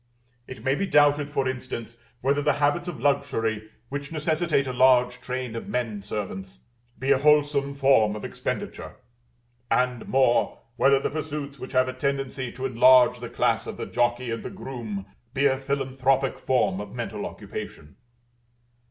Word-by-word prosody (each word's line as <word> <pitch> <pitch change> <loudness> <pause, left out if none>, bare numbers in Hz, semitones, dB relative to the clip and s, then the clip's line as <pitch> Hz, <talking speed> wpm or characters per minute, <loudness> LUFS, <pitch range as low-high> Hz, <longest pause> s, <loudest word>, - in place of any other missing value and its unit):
It 130 - -9
may 135 - +2
be 195 +7 -1
doubted, 145 -1 +4
for 135 -2 0
instance, 125 -3 -5 0.2
whether 140 +3 +2
the 150 +1 +2
habits 145 +5 +1
of 165 -8 -5
luxury, 115 -6 0 0.2
which 140 +1 -5
necessitate 155 -1 +1
a 130 - -3
large 125 -1 +4
train 125 -2 -4
of 115 - -6
men 115 -5 -2
servants, 95 -2 -6 0.4
be 135 +2 0
a 135 - +5
wholesome 145 -1 +3
form 130 -7 +4
of 105 - -6
expenditure; - - -5 0.7
and 125 -2 0
more, 130 -2 +2 0.2
whether 135 0 +4
the - - -2
pursuits 150 -2 -5
which 130 - -8
have 130 0 +3
a 130 - -3
tendency 135 -1 -2
to 130 +1 -6
enlarge 125 0 +5
the 120 -1 -6
class - - 0
of - - -6
the - - -4
jockey 120 0 0
and 115 - -3
the - - -6
groom 120 - -6 0.3
be 140 +1 +2
a 135 -1 +3
philanthropic 135 -1 0
form 105 -7 +1
of 105 - -9
mental - - -4
occupation. 75 - -8
130 Hz, 160 wpm, -25 LUFS, 120-140 Hz, 0.7 s, a